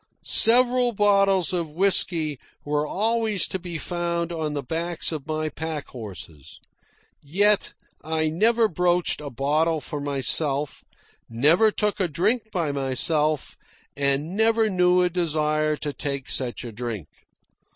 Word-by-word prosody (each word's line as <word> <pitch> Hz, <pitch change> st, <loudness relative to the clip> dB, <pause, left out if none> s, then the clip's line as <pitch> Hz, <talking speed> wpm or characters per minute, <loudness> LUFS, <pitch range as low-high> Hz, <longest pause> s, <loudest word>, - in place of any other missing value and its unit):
Several 245 Hz, +1 st, +4 dB
bottles 195 Hz, -3 st, +2 dB
of 165 Hz, -4 st, -2 dB
whisky 170 Hz, -5 st, +1 dB, 0.3 s
were 150 Hz, +1 st, -1 dB
always 220 Hz, 0 st, 0 dB
to 190 Hz, -, -4 dB
be 175 Hz, -2 st, -6 dB
found 170 Hz, +1 st, -3 dB
on 155 Hz, -3 st, -3 dB
the 140 Hz, -, -3 dB
backs 165 Hz, +7 st, -2 dB
of 155 Hz, -2 st, -6 dB
my 155 Hz, 0 st, -2 dB
pack 155 Hz, -1 st, -5 dB
horses. 95 Hz, -, -10 dB, 0.6 s
Yet 200 Hz, +8 st, +1 dB, 0.3 s
I 160 Hz, 0 st, 0 dB
never 225 Hz, +6 st, +3 dB
broached 175 Hz, -2 st, 0 dB
a 145 Hz, -, -6 dB
bottle 150 Hz, +5 st, 0 dB
for 145 Hz, 0 st, -6 dB
myself, 140 Hz, +1 st, -1 dB, 0.5 s
never 155 Hz, -, +4 dB
took 210 Hz, 0 st, -1 dB
a 185 Hz, -, +1 dB
drink 210 Hz, +9 st, 0 dB
by 170 Hz, -6 st, -1 dB
myself, 145 Hz, +2 st, 0 dB, 0.4 s
and 140 Hz, +5 st, -1 dB
never 220 Hz, 0 st, +2 dB
knew 180 Hz, 0 st, +3 dB
a 180 Hz, -, +2 dB
desire 155 Hz, -3 st, 0 dB
to 145 Hz, -1 st, -4 dB
take 140 Hz, -3 st, -4 dB
such 125 Hz, -3 st, -1 dB
a 120 Hz, -, -7 dB
drink. 110 Hz, -7 st, -6 dB
160 Hz, 135 wpm, -24 LUFS, 145-190 Hz, 0.6 s, Several